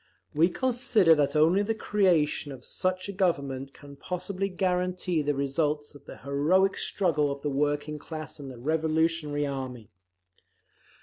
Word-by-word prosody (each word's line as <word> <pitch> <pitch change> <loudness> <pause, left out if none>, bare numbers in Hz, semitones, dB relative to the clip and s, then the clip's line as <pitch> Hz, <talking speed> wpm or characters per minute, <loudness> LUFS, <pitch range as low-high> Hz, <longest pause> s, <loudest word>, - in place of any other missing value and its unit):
We 160 +4 +4
consider 235 -6 +3
that 150 -1 +1
only 165 +6 +4
the 220 +2 -1
creation 175 -9 +1
of 130 -2 -10
such 185 +1 -2
a - - -4
Government 140 -8 -1
can 140 0 -14
possibly 185 +4 -3
guarantee 180 -2 0
the 145 0 0
results 145 +2 -1
of 145 -1 -16
the - - -10
heroic 155 +8 +2
struggle 150 -7 +1
of 140 0 -6
the 145 - -1
working 145 +2 -1
class 155 0 -7
and 140 -2 -7
the 130 - -9
revolutionary 160 +1 0
army. 130 -5 -6
155 Hz, 145 wpm, -28 LUFS, 140-180 Hz, -, We